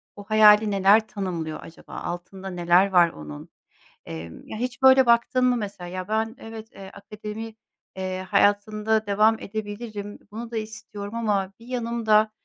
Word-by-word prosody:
o 205 - -10
hayali 215 0 +6
neler 200 +3 +4
tanımlıyor 170 -6 -4
acaba? 165 - -14
Altında 190 +2 -6
neler 175 +2 +3
var 175 -2 +5
onun? 75 - -10 0.6
Eee, 80 0 -7
ya 220 - -7
hiç 250 +2 -4
böyle 265 0 +7
baktın 245 +2 +3
mı 250 -1 +3
mesela; 200 -4 -6
ya 185 +1 -6
ben 220 +2 -1
evet, 225 0 -10
eee, 190 -1 -11
akademi, 215 +2 -8 0.4
eee, 185 0 -4
hayatında 210 +2 +2
devam 215 +2 +3
edebilirim, 205 0 -6
bunu 230 +2 -7
da 225 - -3
istiyorum 215 -1 -7
ama 200 -4 -1
bir 230 - -15
yanım 235 -2 -3
da, 215 0 +4
210 Hz, 155 wpm, -24 LUFS, 190-225 Hz, 0.6 s, böyle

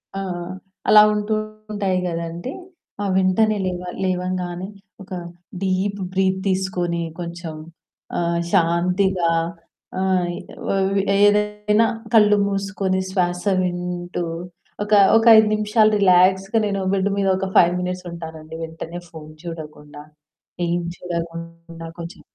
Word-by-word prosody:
ఆ! - - -2 0.7
అలా 210 - +9
ఉంటూ 210 +1 -1 0.4
ఉంటాయి 195 -3 0
గదండీ! 170 +6 -4 0.5
ఆహ్, 200 -1 0
వెంటనే 205 +3 +3
లేవ 180 -1 -2 0.2
లేవంగానే 180 -1 -2 0.4
ఒక 190 - -19 0.5
డీప్ 195 +1 0
బ్రీత్ 190 0 +1
తీసుకొని 180 -3 -1 0.2
కొంచెం 170 -2 -6 0.6
ఆహ్, 170 0 0
శాంతిగా 180 0 +2 0.7
ఆయ్ 180 -2 0 0.6
వ్ - - +1 0.3
ఏదైనా 210 +1 +3 0.3
కళ్ళు 210 -2 +6
మూసుకొని 195 -1 -1
శ్వాస 180 -2 0 0.2
వింటూ 180 0 -3 0.6
ఒక, 210 - -8 0.3
ఒక 225 - +2
5 220 0 +6
నిమిషాలు 215 +1 +3
రిలాక్స్‌గా 190 +2 +4
నేను 200 -1 -1
బెడ్ 195 0 +1
మీద 200 -1 +1
ఒక 195 - -2
5 175 - +6
మినిట్స్ 180 0 -4
ఉంటానండి 160 -1 -8
వెంటనే 165 +1 -7
ఫోన్ 155 -2 -11
చూడకుండా. 150 -3 -9 0.7
ఏం 175 +1 0 0.2
చూడకుండా 170 -1 -6
కొంచెం 170 +4 -8
185 Hz, 110 wpm, -21 LUFS, 170-195 Hz, 0.7 s, అలా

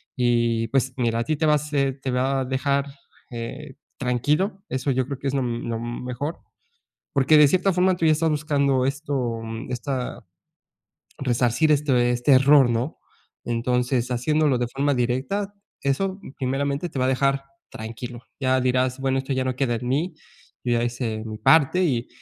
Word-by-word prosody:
y 120 -2 +1
pues 135 +1 +1
mira, 115 -2 0
a 115 - +1
ti 155 - 0
te 160 - +1
va 150 - +5
a - - +5
hacer 140 -2 -1
te 135 - -3
va 130 +2 +1
a - - -2
dejar, 140 +2 0 0.5
eh, 125 +4 -7 0.2
tranquilo. 150 - 0
Eso 130 +2 -1
yo 130 0 +1
creo 140 -2 -5
que 140 - -3
es 135 - -1
lo, 135 - +1
mm, 120 -1 -3
lo 115 - -1
m 120 +1 -5
mejor. 145 +7 -4 0.7
Porque 140 +2 +5
de 150 -1 +8
cierta 185 +4 +2
forma 185 +1 +3
tú 165 - 0
ya 155 - +6
estás 160 +1 +1
buscando 140 -3 +1
esto 135 -5 -2 0.3
esta, 125 +1 -4 0.9
resarcir 125 +2 +1
este 145 -1 +2 0.2
este 120 +3 +1
error, 135 0 +6
¿no? 120 +5 -1 0.5
Entonces, 125 +1 0
haciéndolo 145 +2 +2
de 120 - 0
forma 140 +4 0
directa, 130 +12 -1 0.3
eso 190 +8 0 0.2
primeramente 140 +5 -1
te 135 - -7
va 130 - +2
a - - +2
dejar 135 +1 +1 0.3
tranquilo. 115 +2 -7 0.2
Ya 130 -1 +2
dirás: 130 0 +1
"Bueno, 135 0 0
esto 135 +1 -3
ya 130 0 0
no 130 -1 -1
queda 130 -4 +1
en 120 +2 -4
mí, 155 +7 0 0.5
yo 125 - -1
ya 120 - +1
hice 120 -2 -3
mi 110 -1 -6
parte", 160 +8 +4
y 125 -8 0
130 Hz, 180 wpm, -24 LUFS, 120-145 Hz, 0.9 s, de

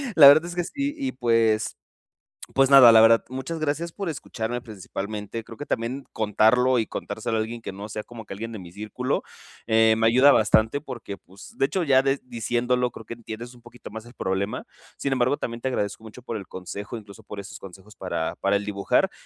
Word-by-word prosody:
la 145 -3 +10
verdad 155 +4 +8
es 175 0 -6
que 175 - 0
sí 280 - -3
y 275 -2 -2
pues 115 -3 +1 0.8
pues, 135 0 +4
nada, 130 -4 +10
la 110 - +8
verdad. 115 0 +6
Muchas 135 +6 -5
gracias 155 +3 -2
por 195 -2 -4
escucharme 120 -4 -4
principalmente. 105 +1 -6
Creo 115 - -11
que 145 - -7
también 125 +4 -3
contarlo 115 +4 +3
y 110 - -1
contárselo 115 - -4
a - - +1
alguien 115 +1 -5
que - - -6
no 100 +2 -8
sea, 105 0 -5
como 115 -2 -11
que 100 - -7
alguien 115 +3 -6
de 110 - -6
mi 90 -2 -10
círculo, 110 +6 -3 0.5
eh, 110 0 +5
me 115 0 +3
ayuda 130 +5 +6
bastante 110 +4 +3
porque, 120 -8 -7
pues, 95 +2 -15
de - - +4
hecho, 185 -3 -1
ya 135 -3 +5
de 135 +1 0
diciéndolo, 125 +1 0
creo 115 -2 -12
que - - -6
entiendes 115 +1 -8
un 120 - -18
poquito 120 -2 -12
más 110 +2 -8
el 120 - -15
problema. 95 +2 -2 0.3
Sin 140 - -2
embargo, 130 +2 +1
también 115 0 -5
te - - -2
agradezco 105 -3 -2
mucho 115 +3 -12
por 115 -3 -4
el 100 - -9
consejo, 100 +5 -7
incluso 105 0 -12
por 105 -1 -9
esos 100 +2 -9
consejos 95 +2 -13
para 90 -3 -3
para 100 +1 +1
el 100 - -1
dibujar. 100 -1 +1
115 Hz, 215 wpm, -25 LUFS, 105-130 Hz, 0.8 s, la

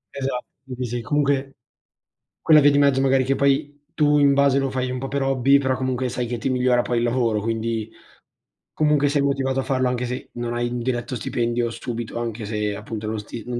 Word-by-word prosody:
Esatto 135 -2 -3 0.3
sì, 125 - -2
sì 120 +1 -3
comunque 140 0 0 0.9
quella 155 -1 +6
via 145 +1 +6
di 140 - +3
mezzo, 140 -2 +4
magari 135 -1 +3
che 135 +1 0
poi 140 +1 0
tu 150 -2 +3
in 140 -1 +5
base 140 -1 +3
lo 135 -1 0
fai 130 -1 -2
un 130 - -3
po' 135 - -4
per 140 +1 -2
hobby 135 +1 +3
però 130 -1 0
comunque 130 -1 -1
sai 125 +1 -3
che 120 0 -3
ti 130 - -2
migliora 125 -1 +2
poi 120 0 -2
il 115 - +1
lavoro, 120 -3 +1
quindi 115 0 -2 0.8
comunque 150 -2 +2
sei 145 -1 +1
motivato 135 -1 0
a - - 0
farlo 130 -1 0
anche 125 0 -2
se 125 +1 -5
non 120 0 -4
hai 120 0 -1
un 120 0 -4
diretto 120 +1 -2
stipendio 120 +1 -1
subito, 120 -1 -5
anche 115 -2 -4
se 105 -1 -2
appunto 105 +1 -6
non 110 0 -2
sti 110 +2 -8
non 120 -1 -3
130 Hz, 215 wpm, -22 LUFS, 120-135 Hz, 0.9 s, quella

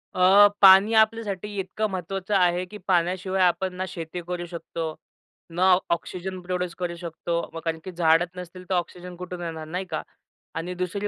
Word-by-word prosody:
अ, 190 +3 +7
पाणी 195 +3 +8
आपल्यासाठी 220 -3 +2
इतकं 200 +3 -2
महत्त्वाचं 190 +2 -3
आहे, 180 -1 +3
की 210 +3 -10
पाण्याशिवाय 185 +1 +1
आपण 180 +1 +1
ना 185 +1 -3
शेती 170 0 -6
करू 175 -1 -3
शकतो, 165 -2 -5 0.5
ना 180 +3 +3 0.2
ऑक्सिजन 185 +2 -3
प्रोड्यूस 180 -1 -3
करू 175 -1 -2
शकतो 170 0 -4 0.2
म 165 - -5
कारण 160 0 -1
की 185 - -6
झाडच 170 0 +3
नसतील 180 0 -9
तर 190 - 0
ऑक्सिजन 180 0 -4
कुठून 180 0 -7
येणार 160 -2 -5
नाही 180 +4 -3
का 155 - -2 0.5
आणि 175 +3 -3
दुसरी 185 +3 -2
180 Hz, 170 wpm, -25 LUFS, 170-190 Hz, 0.5 s, पाणी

